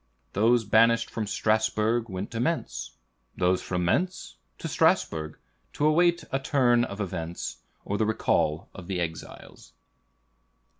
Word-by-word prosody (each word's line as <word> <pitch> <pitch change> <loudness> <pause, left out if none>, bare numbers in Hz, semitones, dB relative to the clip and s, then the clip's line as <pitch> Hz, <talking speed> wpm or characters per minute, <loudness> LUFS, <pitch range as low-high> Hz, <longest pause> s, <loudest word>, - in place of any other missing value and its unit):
Those 115 +3 +3
banished 115 +3 +4
from 110 -2 -3
Strasbourg, 110 +2 +1
went 95 +1 -5
to 115 - -4
Mentz; 120 - -2 0.4
those 90 +1 +2
from 90 -1 -2
Mentz, 180 - -1 0.2
to - - -5
Strasbourg, 80 -1 +1 0.4
to 150 - 0
await 170 +2 +3
a 135 - 0
turn 125 -4 +3
of 100 -4 -5
events, 85 -4 -4 0.3
or 100 - -2
the 110 - +3
recall 80 -6 0
of 90 -2 -10
the 95 -2 -2
exiles." 80 -7 -7
110 Hz, 135 wpm, -27 LUFS, 90-120 Hz, 0.4 s, banished